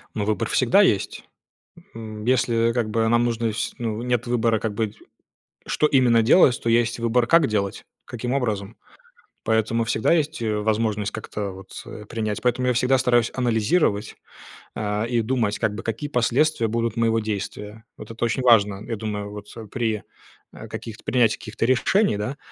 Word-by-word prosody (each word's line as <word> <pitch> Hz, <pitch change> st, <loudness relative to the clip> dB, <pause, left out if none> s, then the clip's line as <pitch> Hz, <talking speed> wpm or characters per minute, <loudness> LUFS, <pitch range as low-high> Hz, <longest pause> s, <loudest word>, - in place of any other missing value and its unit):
Ну, 105 Hz, -, -1 dB
выбор 110 Hz, 0 st, -1 dB
всегда -, -, +4 dB
есть! -, -, +1 dB, 0.7 s
М, 110 Hz, -2 st, -7 dB
если, 115 Hz, -2 st, +2 dB
как 120 Hz, -3 st, -1 dB
бы, 110 Hz, +1 st, +1 dB
нам 120 Hz, +1 st, +3 dB
нужно 115 Hz, -1 st, -1 dB
с 115 Hz, -, -3 dB
ну 115 Hz, -2 st, -3 dB
нет 125 Hz, -1 st, -1 dB
выбора, 115 Hz, -2 st, +1 dB
как 110 Hz, -1 st, -3 dB
бы, 110 Hz, 0 st, -1 dB, 0.8 s
что 150 Hz, -, +1 dB
именно 125 Hz, -5 st, +4 dB
делать, 125 Hz, +1 st, +5 dB
то -, -, -1 dB
есть 115 Hz, 0 st, +2 dB
выбор, 120 Hz, +1 st, +1 dB
как 165 Hz, +3 st, +5 dB
делать, 100 Hz, -3 st, -2 dB, 0.2 s
каким 120 Hz, +1 st, -5 dB
образом. 110 Hz, -5 st, -2 dB, 0.7 s
Поэтому 110 Hz, +1 st, +1 dB
всегда 125 Hz, +7 st, +1 dB
есть, 155 Hz, -3 st, 0 dB
э, 110 Hz, -2 st, 0 dB
возможность 105 Hz, -1 st, 0 dB
как-то 105 Hz, -2 st, -5 dB
вот, 95 Hz, 0 st, -10 dB
э, 105 Hz, -, -9 dB
принять. 110 Hz, -1 st, -3 dB
Поэтому 125 Hz, +1 st, +1 dB
я -, -, +4 dB
всегда 125 Hz, +2 st, +3 dB
стараюсь 120 Hz, -2 st, +2 dB
анализировать, 115 Hz, -, +1 dB, 0.6 s
а, 105 Hz, +1 st, -2 dB
и 120 Hz, 0 st, 0 dB
думать, 110 Hz, -3 st, 0 dB
как 105 Hz, 0 st, 0 dB
бы, 110 Hz, -, -5 dB
какие 115 Hz, +6 st, -4 dB
последствия 125 Hz, +1 st, +2 dB
будут 115 Hz, 0 st, -1 dB
моего 115 Hz, -1 st, +2 dB
действия. 105 Hz, 0 st, -5 dB
Вот -, -, -10 dB
это 115 Hz, -, -6 dB
очень 125 Hz, +3 st, -1 dB
важно, 105 Hz, -5 st, +4 dB
я 115 Hz, -, -2 dB
думаю 105 Hz, -1 st, -5 dB
вот 105 Hz, 0 st, -9 dB, 0.2 s
при, 110 Hz, -4 st, -1 dB, 0.5 s
а, -, -, -10 dB
каких-то 110 Hz, -1 st, -8 dB
принятии 115 Hz, -4 st, +2 dB
каких-то 110 Hz, +1 st, -3 dB
решений, 130 Hz, -, +2 dB
да, 105 Hz, +7 st, -4 dB
115 Hz, 170 wpm, -23 LUFS, 105-120 Hz, 0.8 s, делать